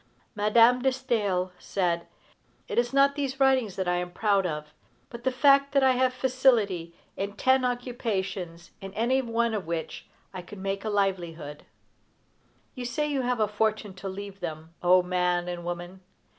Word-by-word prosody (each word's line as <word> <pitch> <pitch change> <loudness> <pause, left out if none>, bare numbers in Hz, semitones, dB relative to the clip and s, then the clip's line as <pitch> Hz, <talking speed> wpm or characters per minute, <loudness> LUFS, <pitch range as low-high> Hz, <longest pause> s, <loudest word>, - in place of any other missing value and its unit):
Madame 230 +3 +4
de 265 - +3
Staël 215 -9 -1
said: 175 -3 -1 0.6
"It - - 0
is 240 0 0
not 275 +1 +4
these 275 -2 -3
writings 260 -7 +3
that 190 -1 -2
I 180 0 +1
am 180 0 -3
proud 195 +1 +1
of, 150 -2 -6 0.4
but 235 0 -9
the 260 - +1
fact 275 +2 +4
that 275 -1 +4
I 265 - +6
have 255 0 +2
facility 240 -10 +1 0.2
in 200 +1 -3
ten 260 +5 +3
occupations, 200 -9 -3
in 195 +1 -8
any 250 +4 +2
one 235 -1 0
of 200 -6 -3
which 165 -1 -4 0.3
I 185 - -5
could 205 +3 -11
make 195 +1 -3
a 220 - -2
livelihood." 175 -7 -2 1.1
You 250 - -6
say 245 +5 -1
you 285 -3 -1
have 250 -1 -1
a 215 - +3
fortune 215 -1 -1
to 195 - -5
leave 200 +1 -8
them. 160 -2 -6
O 180 +1 +5
man 180 -1 0
and 175 -1 -5
woman! 175 +2 -6
205 Hz, 170 wpm, -27 LUFS, 180-250 Hz, 1.1 s, I